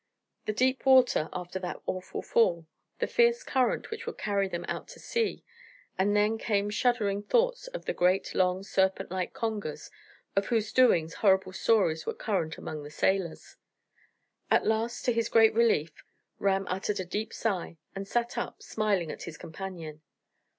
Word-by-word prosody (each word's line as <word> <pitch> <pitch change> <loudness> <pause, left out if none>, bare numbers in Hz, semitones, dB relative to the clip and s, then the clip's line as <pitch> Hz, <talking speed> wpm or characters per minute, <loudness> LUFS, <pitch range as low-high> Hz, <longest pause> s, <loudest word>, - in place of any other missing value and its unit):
The - - +2
deep 255 +4 +1
water 255 -11 +5
after 180 +1 -5
that 180 -1 -5
awful 185 0 -4
fall, 170 -8 +2 0.3
the - - 0
fierce 475 0 +3
current 260 - 0
which 460 +1 -6
would 465 - -5
carry 200 -2 0
him 175 -1 -4
out - - -4
to - - -12
sea 465 -2 -1 0.5
and 200 +2 +2
then 210 +2 +2
came 205 -2 0
shuddering 210 -4 +1
thoughts - - +1
of - - -7
the - - -1
great, 180 +2 +2
long, 185 0 +1
serpent 190 -2 0
like 185 -1 -2
congers, 205 -9 -4 0.4
of 195 0 +1
whose 220 -2 0
doings 170 -11 +4
horrible 190 -2 +2
stories 185 -8 +2
were - - -2
current 175 -7 -2
among 155 -1 -6
the 145 - -9
sailors. 175 +2 -1 0.9
At - - +3
last, 220 +2 0
to 245 - +3
his 230 0 0
great 225 -1 +6
relief, 215 -9 +3 0.5
Ram 195 -1 +1
uttered 200 +2 -2
a 185 - -3
deep 210 +5 -3
sigh, 190 -6 -2 0.2
and 195 0 -5
sat 240 +2 -1
up, - - -5
smiling 200 -7 0
at - - -9
his 165 -2 -8
companion. 165 -3 -8
200 Hz, 165 wpm, -29 LUFS, 180-230 Hz, 0.9 s, great